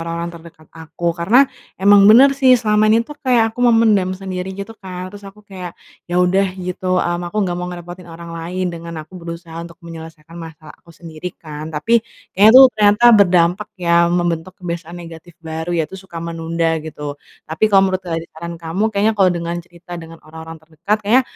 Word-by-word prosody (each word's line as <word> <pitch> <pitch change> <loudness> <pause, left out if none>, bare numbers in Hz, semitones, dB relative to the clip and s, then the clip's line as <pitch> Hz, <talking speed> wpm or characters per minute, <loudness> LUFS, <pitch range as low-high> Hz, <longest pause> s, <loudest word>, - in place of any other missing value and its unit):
orang-orang 170 +1 -4
terdekat 165 -1 -14
aku. 165 +1 -4
Karena 205 +11 +4 0.3
emang 200 +1 +6
bener 265 +5 +7
sih, 265 -2 +5
selama 215 -2 +2
ini 225 +2 +3
tuh 295 +4 -11
kayak 240 -5 +2
aku 245 - -8
memendam 210 -5 +3
sendiri, 185 -1 -5
gitu 200 +3 -7
kan, 185 0 -7
terus 205 0 -12
aku 205 +2 -16
kayak, 185 -3 -9 0.3
ya 175 - -2
udah, 190 +2 +2
gitu, 185 0 -2
mmm, 175 0 -2
aku 190 - -9
nggak 175 -1 -2
mau 180 - -4
ngerepotin 175 0 -9
orang 170 0 -10
lain 175 +3 -4
dengan 170 0 -8
aku 155 - -32
berusaha 170 0 -8
untuk 170 0 -12
menyelesaikan 165 0 -11
masalah 160 -2 -11
aku - - -28
sendiri, 165 +1 -8
kan. 155 -1 -8
Tapi, 225 +10 +1 0.3
kayaknya 205 +3 +6
tuh 265 - +11
ternyata 210 +2 +3
berdampak 185 0 +3
ya, 170 -1 +3
membentuk 175 0 -1
kebiasaan 170 -1 -6
negatif 165 0 -11
baru, 160 +2 -4
yaitu 165 +4 -3
suka 185 -3 -13
menunda, 165 0 -2
gitu. 150 -2 -7 0.3
Tapi 160 +7 0
kalau 195 -1 +4
menurut 185 0 -2
dari 165 -2 -3
saran 170 +2 -7
kamu 165 +5 -3
kayaknya 210 +2 +2
kalau 185 -2 +5
dengan 170 0 -3
cerita 175 +1 -15
dengan 165 0 -12
orang-orang 160 +1 -10
terdekat, 165 +7 -2
kayaknya, 235 +6 +4
175 Hz, 185 wpm, -18 LUFS, 165-195 Hz, 0.3 s, tuh